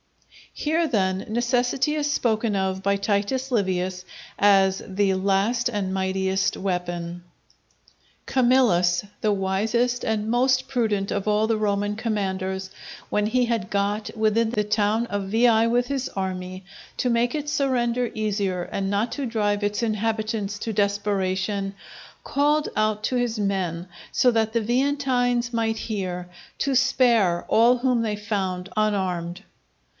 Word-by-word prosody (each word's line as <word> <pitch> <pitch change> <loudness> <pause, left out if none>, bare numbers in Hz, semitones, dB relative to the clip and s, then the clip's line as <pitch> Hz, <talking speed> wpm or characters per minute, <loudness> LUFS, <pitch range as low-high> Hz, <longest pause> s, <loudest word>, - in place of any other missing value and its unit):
_" - - -7
Here, 320 +2 +1
then, 190 -6 0
necessity 245 +5 +1
is 295 -1 0
spoken 220 -5 0
of 190 0 -1
by 200 0 +2
Titus 210 +7 -1
Livius 185 -4 -1 0.3
as 195 -1 +4
the 195 0 +1
last 200 +6 +1
and 200 -4 -2
mightiest 190 0 0
weapon. 175 -2 -3 1.0
Camillus, 225 -9 +3 0.2
the 215 - +2
wisest 220 +6 0
and 220 -1 -1
most 255 +2 +2
prudent 215 -6 0
of 200 0 -2
all 210 +1 +2
the 225 - +2
Roman 205 -1 0
commanders, 190 -4 -2 0.4
when 210 0 +1
he 250 +3 +2
had 230 -5 -2
got 205 +1 -1
within 220 +1 +2
the 215 -2 0
town 210 +2 +1
of 205 -3 -4
Veii 225 +1 +4
with 245 +1 +1
his 275 -2 -2
army, 185 -1 -5 0.3
to 250 - 0
make 235 +1 +1
its 295 -1 -3
surrender 245 -4 +1
easier 200 -4 -1
and 195 +2 -3
not 205 +4 0
to 280 - -3
drive 210 -3 0
its 205 +2 -1
inhabitants 215 -1 -1
to 225 - -3
desperation, 200 -1 -1 0.5
called 295 +2 +1
out 215 0 0
to 255 - -1
his 240 -3 0
men, 185 -4 -1 0.2
so 250 - +4
that 225 -1 +1
the 230 - +1
Veientines 245 -1 +1
might 225 -1 0
hear, 185 -5 -4 0.3
to 275 -1 0
spare 235 -9 +3
all 235 +3 +5
whom 250 -1 +1
they 215 -2 -1
found 195 -3 -3
unarmed. 190 -4 -1
210 Hz, 140 wpm, -24 LUFS, 195-240 Hz, 1.0 s, all